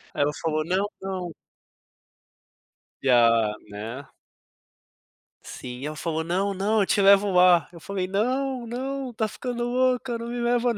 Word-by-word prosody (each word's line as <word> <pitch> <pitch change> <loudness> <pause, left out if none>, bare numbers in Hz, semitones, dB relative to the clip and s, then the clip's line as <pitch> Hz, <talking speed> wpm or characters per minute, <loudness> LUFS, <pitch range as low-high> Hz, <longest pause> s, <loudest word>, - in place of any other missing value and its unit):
Ela 145 +1 +2
falou: 155 -1 0
"Não, 190 +4 0
não" 185 -2 -4 1.7
E 135 - +1
a 115 -3 +4 0.2
né 115 +7 -7 1.4
Sim, 125 -1 -8
e - - -5
ela 155 0 -4
falou: 160 0 -2
"Não, 190 +4 0
não, 205 +3 +1
eu - - +2
te 200 - +2
levo 200 0 +6
lá", 180 -3 +5
eu 170 - -12
falei: 190 +1 -3
"Não, 250 +6 -1
não, 260 +2 -4
tá 220 0 -1
ficando 240 +2 -4
louca, 250 0 +1
não 230 +1 -6
me 240 0 -4
leva 240 0 +1
não, - - -7
195 Hz, 155 wpm, -25 LUFS, 160-240 Hz, 1.7 s, levo